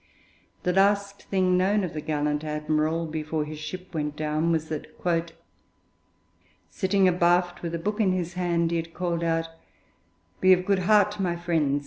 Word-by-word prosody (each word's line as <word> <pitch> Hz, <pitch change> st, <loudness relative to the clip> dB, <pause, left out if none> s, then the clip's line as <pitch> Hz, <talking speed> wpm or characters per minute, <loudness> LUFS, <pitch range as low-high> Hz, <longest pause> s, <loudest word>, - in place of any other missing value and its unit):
The 180 Hz, -, +1 dB
last 200 Hz, +1 st, +2 dB
thing 185 Hz, -2 st, +2 dB
known 200 Hz, +2 st, +2 dB
of 180 Hz, -, -4 dB
the 155 Hz, -, -4 dB
gallant 150 Hz, -1 st, -1 dB
admiral 155 Hz, +2 st, -1 dB
before 155 Hz, -1 st, -3 dB
his 150 Hz, 0 st, -7 dB
ship 185 Hz, +4 st, -7 dB
went 150 Hz, -2 st, -2 dB
down 155 Hz, +2 st, 0 dB
was 160 Hz, -1 st, 0 dB
that 155 Hz, -2 st, -4 dB, 1.8 s
'sitting 190 Hz, 0 st, +2 dB
abaft 175 Hz, 0 st, +2 dB
with 170 Hz, -1 st, -3 dB
a -, -, -1 dB
book 210 Hz, +6 st, -3 dB
in 195 Hz, -3 st, +3 dB
his 180 Hz, -1 st, -2 dB
hand,' 170 Hz, -2 st, 0 dB
he 170 Hz, -, +1 dB
had 165 Hz, 0 st, -5 dB
called 170 Hz, -2 st, -1 dB
out 165 Hz, 0 st, 0 dB, 0.9 s
'Be 185 Hz, 0 st, +6 dB
of 180 Hz, 0 st, +1 dB
good 200 Hz, -1 st, +2 dB
heart, 210 Hz, -1 st, +4 dB
my 180 Hz, -3 st, 0 dB
friends! 160 Hz, -5 st, 0 dB
170 Hz, 165 wpm, -26 LUFS, 155-185 Hz, 1.8 s, Be